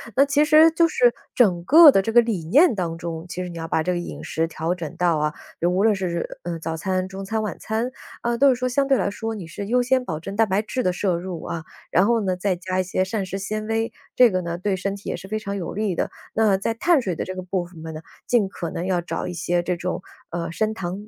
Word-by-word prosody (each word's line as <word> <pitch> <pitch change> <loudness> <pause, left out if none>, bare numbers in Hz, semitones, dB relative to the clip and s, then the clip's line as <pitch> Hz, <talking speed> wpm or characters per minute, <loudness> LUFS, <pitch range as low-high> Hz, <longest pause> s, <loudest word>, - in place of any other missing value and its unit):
那 275 - +6
其 285 +1 +3
实 310 +1 +7
就 330 +1 +4
是 245 -6 +3 0.2
整 185 -8 +3
个 310 - +9
的 195 - +3
这 225 +3 -3
个 240 - +8
理 215 -8 -2
念 285 - +5
当 170 -4 -2
中， 165 -1 -5
其 180 +1 -4
实 180 - -6
你 170 - -8
要 165 0 -5
把 160 - 0
这 180 - 0
个 180 - -1
饮 175 - -7
食 165 +1 -1
调 165 +1 -2
整 165 -5 -6
到 175 -2 +2
啊， 150 0 0 0.3
就 170 - +2
无 185 +3 +1
论 220 -1 +5
是 190 -2 -2
是， 170 0 -4
嗯， 170 -1 -3
早 160 0 -3
餐、 185 +2 -1
中 195 0 -7
餐、 220 +2 -1
晚 200 -6 -4
餐， 225 +3 -2 0.3
啊， 235 0 0
都 280 +1 +6
是 255 - +4
说 255 0 -1
相 275 +2 +1
对 270 - +4
来 - - 0
说 225 +2 -4
你 195 -5 -7
是 185 +5 -6
优 245 +3 +2
先 255 0 +1
保 160 -7 -3
证 195 +5 -7
蛋 225 - +4
白 195 +1 +1
质 255 +4 -3
的 180 - +1
摄 180 0 0
入 175 -2 -6
啊， 160 -1 -5 0.3
然 185 - +4
后 235 -1 +2
呢， 185 -3 -1
再 190 0 0
加 185 +1 -3
一 - - +2
些 185 +1 0
膳 200 0 -2
食 190 +1 -4
纤 215 +2 -4
维， 225 0 -1 0.2
这 245 -4 +6
个 185 - 0
呢， 170 0 -3
对 190 +2 -1
身 195 +2 -2
体 200 - -8
也 - - -2
是 195 - -10
非 215 +2 -2
常 200 -1 -4
有 180 - -4
利 205 -2 -1
的。 - - -1 0.2
那 215 -3 +3
在 210 +4 -1
碳 310 +6 +3
水 190 -6 -2
的 - - -3
这 185 - -6
个 185 - -4
部 180 -1 -2
分 170 -2 -12
分 160 -1 -6
呢， 155 - -7 0.3
尽 230 -5 +3
可 170 -4 -5
能 170 - -4
要 185 -2 +1
找 170 - -4
一 180 - -4
些 175 +1 0
这 180 0 -1
种， 180 0 -3 0.3
呃， 170 -1 -4
升 215 +5 0
糖 195 0 -5
190 Hz, 305 characters per minute, -23 LUFS, 175-225 Hz, 0.3 s, 个